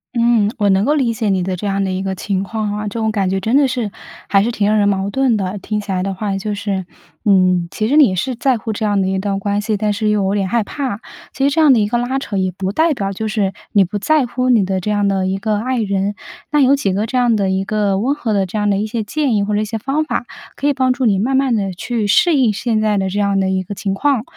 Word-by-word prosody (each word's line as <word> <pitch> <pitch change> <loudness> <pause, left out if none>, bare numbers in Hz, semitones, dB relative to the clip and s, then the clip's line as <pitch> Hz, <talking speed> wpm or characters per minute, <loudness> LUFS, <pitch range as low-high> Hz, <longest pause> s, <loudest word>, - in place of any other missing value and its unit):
嗯， 235 -3 +3
我 205 -3 +2
能 195 +2 +3
够 295 - +2
理 255 -6 +1
解 220 -2 -1
你 185 -2 +1
的 185 0 -2
这 200 +3 -4
样 195 0 0
的 190 - -1
一 185 0 -2
个 190 0 -3
情 190 0 -2
况 215 0 -3
啊。 210 0 -4
这 225 +3 -4
种 220 -1 0
感 195 -3 0
觉 190 - 0
真 220 +7 0
的 280 -1 +5
是， 240 -5 -2 0.4
还 195 - +4
是 235 - 0
挺 210 -3 0
让 215 - +2
人 205 - +3
矛 195 -1 0
盾 260 -3 +2
的。 195 +1 -3
听 210 +2 -3
起 205 -1 -5
来 185 -1 0
的 195 +1 -3
话， 200 0 -2
就 205 +1 -3
是， 200 -3 -3 0.4
嗯， 185 -3 +3
其 215 +4 -2
实 280 - +1
你 275 -11 +5
是 255 +8 -1
在 255 +1 +1
乎 220 +1 -4
这 220 - -4
样 205 -2 +1
的 190 - 0
一 190 0 -1
段 195 0 -1
关 205 +1 -1
系， 215 0 -1
但 210 0 0
是 215 +1 -1
又 210 -2 +1
有 190 - 0
点 195 -2 -1
害 235 0 +1
怕。 250 -2 -4 0.3
其 270 - -3
实 280 - 0
这 320 - +2
样 300 - +6
的 230 - +3
一 205 - +1
个 240 +2 0
拉 255 +2 -1
扯， 210 -7 -4
也 185 -1 0
不 190 +1 -3
代 320 +8 +2
表 195 -4 -2
就 220 +3 -3
是 205 -3 -1 0.2
你 200 -2 +5
不 205 +3 -4
在 305 +4 +2
乎 255 +1 -1
你 225 -6 +4
的 190 0 -1
这 200 - -4
样 205 -1 +1
的 190 -1 0
一 190 +1 -1
个 215 +1 -1
爱 255 +2 -1
人。 200 -1 -1 0.4
那 295 - +3
有 275 0 +5
几 210 -8 -1
个 205 +4 0
这 240 - -6
样 245 -2 +3
的 195 -2 0
一 190 0 0
个 200 -1 0
温 270 +6 0
和 230 -7 -2
的 195 -2 +1
这 200 - -5
样 210 0 0
的 200 - +1
一 210 +2 -1
些 225 0 -3
建 270 +2 0
议 200 - +1
或 210 - -2
者 210 - +1
一 - - -1
些 225 +2 -4
方 275 +7 -1
法， 305 - -3 0.3
可 - - -5
以 290 - +3
帮 260 -1 +1
助 255 0 -1
你 200 -3 +3
慢 265 +6 +1
慢 270 -2 +2
地 195 -2 -1
去 225 +2 -2
适 345 - +4
应 255 -5 +3
现 220 +1 -1
在 215 -1 +1
的 190 -1 -1
这 205 - -2
样 200 -1 +1
的 190 0 +1
一 190 0 0
个 200 +2 -7
情 195 0 -2
况。 260 +2 +1
210 Hz, 325 characters per minute, -18 LUFS, 195-240 Hz, 0.4 s, 样